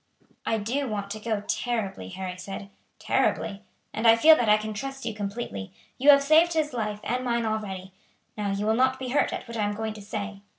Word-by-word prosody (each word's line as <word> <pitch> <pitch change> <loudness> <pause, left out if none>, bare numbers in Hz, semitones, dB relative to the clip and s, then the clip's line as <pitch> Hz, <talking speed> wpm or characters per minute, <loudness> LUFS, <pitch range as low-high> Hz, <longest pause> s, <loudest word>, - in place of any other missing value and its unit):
"I 225 - +2
do 250 +7 -1
want 200 -2 -4
to 215 - -4
go 215 -1 -2
terribly," 205 - -2
Harry 185 - -5
said, 195 +2 -8 0.3
"terribly; 200 -1 0 0.3
and 225 +2 +1
I 225 - +9
feel 315 +7 +8
that 240 -7 +1
I 210 - +7
can 215 0 -4
trust 270 +4 -6
you 225 - -2
completely. 200 - -5 0.3
You 275 +3 +4
have 280 -1 +8
saved 320 +4 +5
his 310 -3 0
life 210 -3 -2
and 250 +2 -1
mine 235 -2 0
already. 195 -4 -4 0.4
Now 210 -1 -2
you 200 +1 -1
will 220 - +3
not 260 +2 +3
be 260 -1 -5
hurt 280 - +2
at - - -5
what 235 0 -6
I 215 - +1
am 205 0 -1
going 220 0 -3
to 215 - -10
say. 205 -1 -5
220 Hz, 220 wpm, -26 LUFS, 205-245 Hz, 0.4 s, I